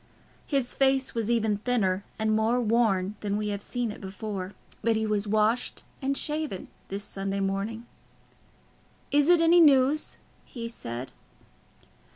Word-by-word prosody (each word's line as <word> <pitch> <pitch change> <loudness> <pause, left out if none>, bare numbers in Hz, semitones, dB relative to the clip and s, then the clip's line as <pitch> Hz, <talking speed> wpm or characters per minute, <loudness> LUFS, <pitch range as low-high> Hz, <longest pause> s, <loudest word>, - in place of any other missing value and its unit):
His 275 -4 0
face 270 -1 +2
was 230 -1 -2
even 220 -3 +2
thinner 205 -4 0
and 220 0 +1
more 225 +3 +2
worn 215 -5 +2
than 205 -1 -1
we 210 0 -2
have 200 -1 -3
seen 240 +1 -2
it - - -10
before, 195 -1 -5 0.3
but 230 -1 +2
he 220 0 0
was 210 -1 0
washed 215 +3 +1 0.2
and 275 +1 0
shaven 300 -10 -3 0.2
this 200 +1 -4
Sunday 195 0 -3
morning. 200 +4 -2 1.3
"Is 290 +2 +4
it 350 -2 +6
any 335 +1 +6
news?" 285 0 +4 0.3
he 230 -2 -7
said. 125 - -6
220 Hz, 145 wpm, -27 LUFS, 200-250 Hz, 1.3 s, it